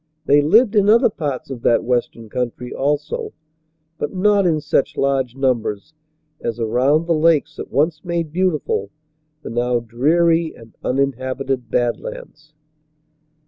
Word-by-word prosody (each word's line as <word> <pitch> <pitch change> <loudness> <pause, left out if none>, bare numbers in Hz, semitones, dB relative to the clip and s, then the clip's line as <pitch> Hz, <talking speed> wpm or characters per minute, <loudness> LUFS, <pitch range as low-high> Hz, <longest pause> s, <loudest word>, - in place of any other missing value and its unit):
They 145 +1 +5
lived 215 - +4
in 205 -1 +4
other 235 +1 +5
parts 145 -7 -4
of 125 -3 -6
that 115 - +3
western 120 -2 -2
country, 125 +2 -4
also, 145 +2 -2 0.7
but - - -2
not 200 0 +3
in 160 -3 +2
such 150 -2 0
large 135 -3 0
numbers 125 -2 -1 0.5
as 115 0 -4
around 130 +8 +2
the 170 - +1
lakes 160 -1 +2
that - - -7
once 155 +2 0
made 170 -3 -3
beautiful 165 - 0 0.5
the - - -6
now 120 +1 0
dreary 160 +8 +1
and 115 -1 -16
uninhabited 130 -1 -2
Bad 120 +1 0
Lands. - - -10
140 Hz, 140 wpm, -20 LUFS, 125-165 Hz, 0.7 s, They